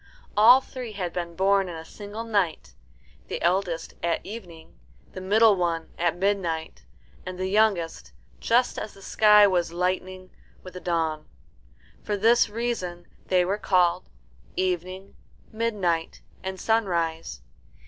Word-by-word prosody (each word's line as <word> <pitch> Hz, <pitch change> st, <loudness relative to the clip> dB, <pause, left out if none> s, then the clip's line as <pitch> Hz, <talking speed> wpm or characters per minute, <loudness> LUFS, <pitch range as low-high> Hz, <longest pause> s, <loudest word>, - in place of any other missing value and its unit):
All 240 Hz, +5 st, +8 dB
three 250 Hz, -4 st, -8 dB
had 180 Hz, -4 st, -4 dB
been 170 Hz, -1 st, -4 dB
born 195 Hz, +1 st, +2 dB
in 170 Hz, -, -6 dB
a 160 Hz, 0 st, -8 dB
single 205 Hz, +5 st, -8 dB
night: 195 Hz, -, -1 dB, 0.5 s
the -, -, -4 dB
eldest 175 Hz, -2 st, 0 dB
at 170 Hz, -1 st, 0 dB
evening, 180 Hz, -6 st, -10 dB, 0.3 s
the 185 Hz, -, -8 dB
middle 210 Hz, +3 st, +5 dB
one 170 Hz, -3 st, -2 dB
at 170 Hz, -1 st, +1 dB
midnight, 170 Hz, -, -2 dB, 0.4 s
and 185 Hz, 0 st, -7 dB
the 185 Hz, -, -2 dB
youngest 190 Hz, -, +1 dB, 0.3 s
just 245 Hz, +2 st, +2 dB
as 215 Hz, -, -7 dB
the 195 Hz, -, -15 dB
sky 210 Hz, 0 st, +6 dB
was 175 Hz, -4 st, +1 dB
lightening 185 Hz, +1 st, -3 dB, 0.3 s
with 185 Hz, -, -10 dB
the 180 Hz, -, -7 dB
dawn. 165 Hz, -3 st, -2 dB, 0.7 s
For 210 Hz, -1 st, -2 dB
this 230 Hz, +3 st, +4 dB
reason 205 Hz, -6 st, -3 dB, 0.2 s
they 180 Hz, -1 st, +3 dB
were 200 Hz, +3 st, -1 dB
called 180 Hz, -3 st, +2 dB, 0.5 s
Evening, 185 Hz, +1 st, -3 dB, 0.4 s
Midnight, 200 Hz, -8 st, -1 dB, 0.2 s
and 190 Hz, 0 st, -5 dB
Sunrise. 170 Hz, -8 st, -1 dB
185 Hz, 135 wpm, -25 LUFS, 170-210 Hz, 0.7 s, All